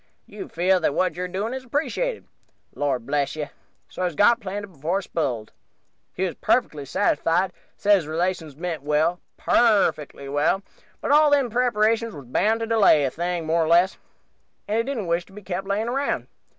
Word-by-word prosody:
You 380 - -9
feel 185 +2 +2
that 160 - 0
what 185 -2 +1
you're 180 +1 -3
doing 200 +6 -3
is 260 0 -5
appreciated. 325 - -2 0.5
Lord 135 -5 -1
bless 140 +1 -1
you, 150 -1 -4 0.4
so's 180 -2 -3
he - - -16
got 235 +6 +5
planted 205 -1 -5
before 170 +3 -2
he - - -8
sp'iled, 125 -12 -3 0.6
he 185 - -2
was 185 - -1
perfectly 150 - 0
satisfied; 170 +7 +1 0.2
said 205 0 +4
his 165 -5 -4
relations 165 -2 -2
meant 165 -1 -4
well, 155 +4 +1 0.2
perfectly 195 -11 +2
well, 145 +7 +1 0.4
but - - -1
all 300 +1 +6
them 280 -5 +2
preparations 230 -2 +1
was 140 -3 -10
bound 215 - +1
to - - 0
delay 220 -9 +4
the 135 - 0
thing 175 0 -2
more 165 +1 +2
or - - -1
less, 175 +3 +3 0.7
and 215 - 0
he - - +2
didn't 250 -5 -3
wish 170 0 0
to 195 - -18
be 210 +1 -11
kept 190 +1 -4
layin' 205 +3 -1
around. 275 +4 -1
185 Hz, 185 wpm, -24 LUFS, 155-220 Hz, 0.7 s, all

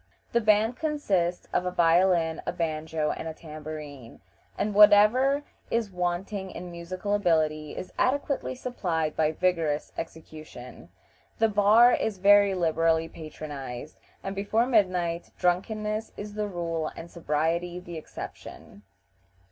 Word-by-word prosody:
The 235 - +2
band 215 +3 +3
consists 200 - -1
of - - +2
a 180 - -1
violin, 170 -1 +3
a - - +1
banjo, 155 -1 -2
and - - -5
a 160 - -6
tambourine, 150 -5 -9 0.4
and 210 - -1
whatever 215 +7 +6 0.3
is 230 -3 -1
wanting 185 +2 -3
in 180 -1 -8
musical 185 +4 -4
ability 155 -6 +1
is 185 - -7
adequately 280 0 0
supplied 175 -12 -2
by 155 -1 +2
vigorous 160 -3 0
execution. 155 -6 -10 0.5
The 225 0 +3
bar 215 +4 +6
is 215 -3 -1
very 200 0 +5
liberally 165 -1 +1
patronized, 150 -4 -8 0.2
and 195 0 -4
before 210 +4 +1
midnight 180 -8 +1
drunkenness 215 +4 -1
is 205 0 -7
the 210 0 -2
rule 165 -4 -3
and 170 +1 -9
sobriety 170 +2 -1
the 175 -2 -8
exception. 105 - -10
175 Hz, 125 wpm, -27 LUFS, 160-205 Hz, 0.5 s, whatever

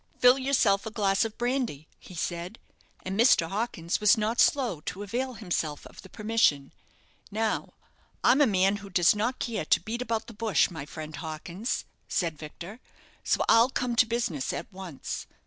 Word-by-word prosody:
"Fill 250 +2 +6
yourself 240 -7 +2
a - - -2
glass 195 -2 +1
of 225 -1 -5
brandy," 240 - -2
he 180 - -13
said. 175 +5 -4 0.5
And 190 +1 -3
Mr. 230 -8 +5
Hawkins 195 -5 -2
was 210 +3 +6
not 220 +3 -1
slow 245 - +3
to 185 +4 -4
avail 250 +5 -3
himself 170 -8 -3
of - - -12
the 190 - -14
permission. 210 -12 +1 0.6
"Now, 220 +1 -2 0.5
I'm 285 - +5
a 290 - +6
man 195 0 +2
who 200 -1 -10
does 175 +1 +4
not 235 +5 -1
care 230 -3 -3
to 210 -3 +4
beat 230 +6 -4
about 225 -2 -2
the 230 - -11
bush, 215 -3 +1
my 150 -4 -7
friend 155 -1 -7
Hawkins," 170 - -4 0.2
said 170 -3 -1
Victor, 170 +8 -9 0.4
"so - - +1
I'll 230 +2 +6
come 250 -2 -1
to 245 - +5
business 225 - -1
at - - -6
once. 185 -7 -6
210 Hz, 175 wpm, -28 LUFS, 175-235 Hz, 0.6 s, Fill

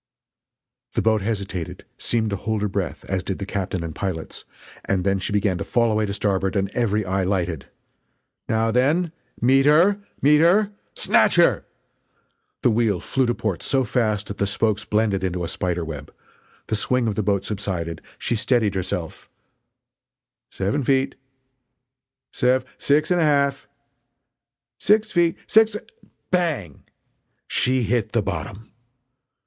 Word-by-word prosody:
The - - +1
boat 110 -2 +3
hesitated 100 -5 -4
seemed 110 -2 0
to - - 0
hold 105 +1 -2
her - - +2
breath, 95 -2 -4
as 95 -2 -2
did 95 0 -3
the 100 - -5
captain 95 -3 -3
and 80 -1 -5
pilots 90 -4 -5 0.4
and 95 -2 0
then 100 0 +1
she 95 - -4
began 100 -3 +1
to - - -2
fall 115 +1 +1
away 110 0 +1
to 100 - -3
starboard 95 -1 0
and 100 0 0
every 110 -3 0
eye 95 +1 0
lighted: 90 -5 -1 0.8
"Now 110 0 +2
then! 150 +8 +2 0.3
meet 135 +3 +4
her! 175 +7 +5 0.2
meet 150 +2 +5
her! 195 +6 +4 0.2
Snatch - - +3
her!" - - +4 1.0
The 120 - +4
wheel 110 -4 +1
flew 130 +6 0
to 120 - 0
port 100 -7 -2
so 135 -1 +1
fast 110 -4 0
that 105 - -8
the 100 - +1
spokes 105 0 0
blended 105 -3 +1
into 90 -1 -2
a - - -2
spider 90 0 -2
web 75 -3 -7 0.5
the 110 - -1
swing 125 +3 +1
of 110 - 0
the 110 - -1
boat 100 -1 0
subsided 90 -6 -3 0.2
she - - -1
steadied 110 -2 +1
herself 95 -2 -4 1.2
"Seven 100 +9 -1
feet!" 135 +1 +2 1.2
"Sev 125 +1 +2
six 150 +4 +2
and 175 -1 +3
a - - +4
half!" 140 -2 +1 1.1
"Six 215 +1 +3
feet! 170 -2 +2
Six 220 0 +4
f - - -5 0.3
" - - -49
Bang! 155 - -1 0.6
She 130 0 +1
hit 115 0 0
the 115 -3 +2
bottom! 100 +3 -5
110 Hz, 155 wpm, -23 LUFS, 95-130 Hz, 1.2 s, her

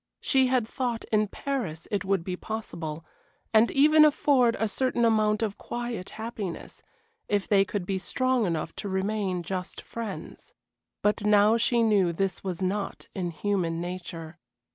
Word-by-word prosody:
She 265 -2 +3
had 250 -3 +1
thought 240 -2 -2
in 215 -1 +3
Paris 200 - -4
it 205 - 0
would 190 -2 0
be 180 +1 -3
possible, 170 -7 -6 0.5
and 220 +1 +6
even 305 +2 +6
afford 280 -5 +4
a 220 - 0
certain 240 +2 +1
amount 215 -1 +3
of 205 -2 -3
quiet 240 -5 -4
happiness, 220 -5 -6 0.5
if 205 -2 +1
they 195 -2 +5
could 195 -1 -3
be 190 0 -1
strong 255 +2 +1
enough 165 -3 -2
to 205 - -4
remain 190 -1 -1
just 185 +1 -4
friends. 230 -4 -7 0.5
But 210 0 +2
now 210 +1 +5
she 235 0 +2
knew 200 -6 +3
this 185 +2 -2
was 185 -1 -3
not 195 +2 -3
in 180 -2 -2
human 170 -1 -1
nature. 175 -2 -6
205 Hz, 155 wpm, -27 LUFS, 185-230 Hz, 0.5 s, and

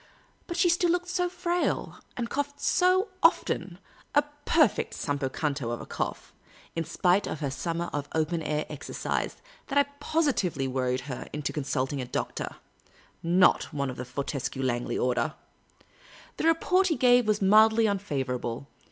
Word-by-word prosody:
But 345 - -4
she 355 0 +4
still 350 0 +3
looked 355 +1 0
so 360 0 0
frail, 350 0 -1 0.2
and 240 -2 -1
coughed 285 +3 -3
so 370 +3 +3
often - - +2 0.2
— - - -21
a 290 - +6 0.2
perfect 310 -10 +2
Campo 140 -2 -1
Santo 140 -5 -2
of 120 - -3
a - - -7
cough - - -4 0.2
— - - -25
in 165 - 0
spite 185 +5 +2
of 155 - -4
her 140 -2 -1
summer 170 +5 -2
of 145 0 -3
open 160 +1 0
air 150 0 -1
exercise, 150 -3 -3 0.3
that 280 - -1
I 285 - +7 0.2
positively 265 - 0
worried 130 -1 -1
her 130 -1 -6
into 150 -2 -3
consulting 135 -1 -1
a - - -4
doctor - - -4 0.4
— - - -30 0.2
not - - +2
one 140 -3 -2
of 125 - -9
the 125 - -4
Fortescue 135 0 -3
Langley 120 -2 -1
order. 125 -1 0 1.0
The - - -1
report 365 +3 +3
he 325 - +1
gave 245 -2 +5
was 210 -1 +2
mildly 220 +3 +5
unfavourable. 135 - -2
165 Hz, 165 wpm, -28 LUFS, -, 1.0 s, I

